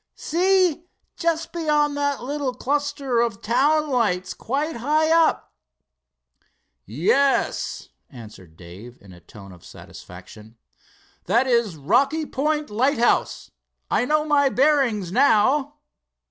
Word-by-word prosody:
"See, 360 -1 0 0.3
just 330 -1 -2
beyond 300 -3 0
that 285 -2 -2
little 275 -1 -3
cluster 280 -2 -1
of 230 -4 -2
town 290 +7 +1
lights 185 -8 -1
quite 285 +4 -3
high 305 +6 +1
up." 330 -1 +1 1.3
"Yes," 190 - 0 0.2
answered 105 - -14
Dave 95 +8 -13
in 100 -2 -16
a 90 - -15
tone 100 +2 -14
of 90 -2 -16
satisfaction. 105 +5 -14 0.7
"That 240 +3 +2
is 235 -8 0
Rocky 275 - +1
Point 300 0 -2
lighthouse. 240 +2 0 0.4
I - - +1
know 305 +2 0
my 285 -2 +2
bearings, 260 - +1
now." 270 +4 +2
270 Hz, 110 wpm, -22 LUFS, 195-300 Hz, 1.3 s, That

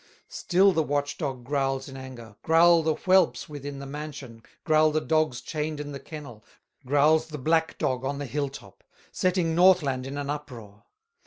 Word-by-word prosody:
Still 190 +2 +3
the 165 - +1
watch 145 -1 -2
dog 135 -6 -4
growls 135 0 -1
in 135 - -10
anger, 125 -5 -10
Growl 165 +1 +5
the 160 -1 0
whelps 185 0 +2
within 145 -2 -7
the 140 - -7
mansion, 140 -5 -8 0.2
Growl 155 0 +4
the 155 +1 0
dogs 155 -6 0
chained 155 -1 -4
in 145 0 -6
the 140 - -7
kennel, 135 -10 -10 0.4
Growls 155 +3 +3
the 155 -1 -7
black 160 +4 0
dog 130 0 -1
on 140 +1 -2
the 145 - -4
hill 140 +2 -2
top, 135 - -13 0.3
Setting 180 -3 0
Northland 160 -8 +3
in 140 +1 -6
an 145 0 -3
uproar. 120 -9 -9
145 Hz, 175 wpm, -26 LUFS, 135-160 Hz, 0.4 s, Growl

